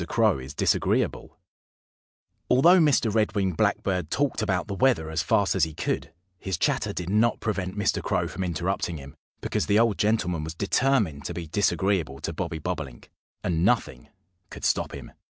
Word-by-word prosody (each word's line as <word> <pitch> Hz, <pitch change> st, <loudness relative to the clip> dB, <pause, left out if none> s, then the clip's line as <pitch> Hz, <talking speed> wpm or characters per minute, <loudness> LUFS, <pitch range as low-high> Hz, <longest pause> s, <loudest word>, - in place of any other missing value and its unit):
CROW 110 Hz, -, +2 dB
IS 65 Hz, +2 st, -9 dB
DISAGREEABLE -, -, 0 dB, 1.1 s
ALTHOUGH 170 Hz, +9 st, +6 dB
Mr. 140 Hz, -9 st, +3 dB
Red 105 Hz, -2 st, +1 dB
winged 95 Hz, -4 st, 0 dB
Blackbird 90 Hz, 0 st, 0 dB
talked 140 Hz, +3 st, 0 dB
about 95 Hz, -4 st, 0 dB
the 100 Hz, -, -4 dB
weather 100 Hz, -8 st, +1 dB
as 80 Hz, +1 st, 0 dB
fast 95 Hz, +3 st, +2 dB
as 95 Hz, -, +1 dB
he 80 Hz, -2 st, -1 dB
could, -, -, -2 dB, 0.3 s
his 95 Hz, -4 st, -3 dB
chatter -, -, 0 dB
did 90 Hz, -, -5 dB
not 110 Hz, +3 st, +2 dB
prevent 100 Hz, -3 st, -3 dB
Mr. 105 Hz, -, 0 dB
Crow -, -, 0 dB
from 95 Hz, -, -5 dB
interrupting 85 Hz, 0 st, -2 dB
him, 70 Hz, 0 st, -11 dB, 0.3 s
because -, -, -1 dB
the 100 Hz, -, +3 dB
old 115 Hz, -2 st, +2 dB
gentleman 90 Hz, -7 st, +1 dB
was 80 Hz, +1 st, -6 dB
determined 100 Hz, -, +1 dB
to -, -, -4 dB
be 85 Hz, -, -5 dB
disagreeable 95 Hz, -4 st, 0 dB
to 85 Hz, -, -3 dB
Bobby 85 Hz, 0 st, -4 dB
Bobolink, -, -, -6 dB, 0.3 s
and 85 Hz, -2 st, 0 dB
nothing 95 Hz, -, 0 dB, 0.4 s
could -, -, -7 dB
stop -, -, +1 dB
him. -, -, -10 dB
95 Hz, 170 wpm, -26 LUFS, 80-110 Hz, 1.1 s, ALTHOUGH